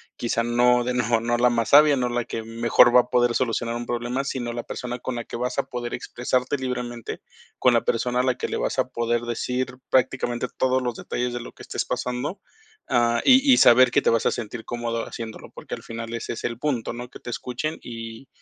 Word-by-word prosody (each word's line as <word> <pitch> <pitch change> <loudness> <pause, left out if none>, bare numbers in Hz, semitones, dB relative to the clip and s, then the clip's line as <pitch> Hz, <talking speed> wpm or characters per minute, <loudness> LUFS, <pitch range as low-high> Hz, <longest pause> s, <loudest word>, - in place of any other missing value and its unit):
Quizá 115 -1 -1
no 120 +1 +3
de 125 - -1
no 120 -2 +1
no 120 +1 0
la 125 +1 +4
más 115 -2 0
sabia, 145 0 +7
no 125 -1 0
la 120 0 -1
que 115 - -5
mejor 115 +1 +4
va 125 - +9
a 125 - -14
poder 120 -1 +3
solucionar 115 -1 -1
un 120 - -3
problema, 120 +3 -2
sino, 125 -4 -3
la 120 - -3
persona 125 0 -5
con 130 +1 -4
la 120 - -4
que - - -9
vas 125 +1 -3
a - - +2
poder 120 -1 -5
expresarte 125 +3 -1
libremente, 125 -3 -5 0.4
con - - +4
la - - +3
persona 125 +2 0
a - - +3
la 130 -1 +1
que - - -3
le - - -3
vas - - -2
a - - +1
poder 120 0 0
decir 125 +2 -3
prácticamente 125 -2 +1
todos 130 0 +2
los 120 -2 -2
detalles 125 +1 -3
de 120 - -3
lo 120 - -9
que - - -13
estés - - -3
pasando, 125 +10 -3 0.5
ah, 120 -1 +3
y 265 +1 +6
y 250 - +7
saber 125 +1 +7
que - - +2
te - - +4
vas 115 -1 +2
a - - +2
sentir 115 0 -5
cómodo 120 -1 -3
haciéndolo, 115 -2 -8
porque - - -8
al - - -5
final 115 0 -6
ese 115 - -4
es - - -8
el 115 -1 -3
punto, 125 -6 -1
¿no? 120 +1 -7
Que - - -12
te 120 - -7
escuchen, 125 +7 -4
y 115 +2 -8
120 Hz, 235 wpm, -24 LUFS, 120-125 Hz, 0.5 s, va